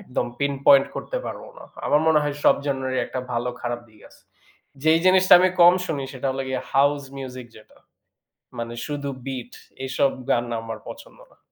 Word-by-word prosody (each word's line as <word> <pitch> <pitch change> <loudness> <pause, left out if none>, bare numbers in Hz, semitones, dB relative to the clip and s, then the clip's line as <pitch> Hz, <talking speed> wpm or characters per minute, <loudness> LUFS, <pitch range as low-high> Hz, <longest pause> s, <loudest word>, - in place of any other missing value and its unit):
একদম 160 -12 -3
pinpoint 140 0 +4
করতে - - -4
পারবো - - -7
না। - - -12 0.2
আমার 150 - +3
মনে 160 -1 +5
হয়, 145 -1 -2
সব - - +7
জনরারই 130 -2 -1
একটা 130 - -4
ভালো, 120 +1 -1
খারাপ 120 0 -3
দিক 110 -1 -22
আছে। - - -21 0.6
যেই 160 +1 +4
জিনিসটা 185 0 +5
আমি 185 +1 +4
কম 175 +1 +8
শুনি, 145 -5 -3
সেটা 130 0 -5
হলো 135 +1 -3
গিয়ে 130 -1 -2
হাউস 140 +1 +3
মিউজিক 130 -2 -7
যেটা, 110 - -18 0.8
মানে 115 0 -5
শুধু 145 -2 -4 0.2
বীট। 130 -3 -6 0.3
এই 135 - -4
সব 135 - +3 0.2
গান 120 - +2 0.2
আমার 115 0 -7
পছন্দ - - -12
না। - - -25
135 Hz, 180 wpm, -23 LUFS, 125-145 Hz, 0.8 s, কম